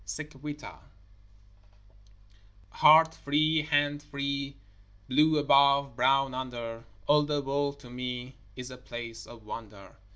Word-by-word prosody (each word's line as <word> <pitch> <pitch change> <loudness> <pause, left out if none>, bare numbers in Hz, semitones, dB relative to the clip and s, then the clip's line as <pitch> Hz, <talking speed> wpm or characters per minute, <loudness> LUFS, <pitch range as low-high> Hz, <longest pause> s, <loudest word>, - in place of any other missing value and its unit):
SIC 145 +10 -7
VITA 145 +2 -8 1.9
Heart 160 +1 +6
free, 155 +2 +1
hand 145 -1 +1
free, 140 -1 -4 0.5
Blue 155 +4 +3
above, 140 -2 +4
brown 135 +2 +2
under, 120 -3 -6 0.2
All 150 +4 +5
the 145 0 -1
world 140 +1 -2
to 125 - -13
me 125 +1 -5 0.2
Is 125 0 -8
a 125 - -9
place 120 -2 -8
of 115 -2 -13
wonder. 105 -3 -10
140 Hz, 120 wpm, -29 LUFS, 125-145 Hz, 1.9 s, Heart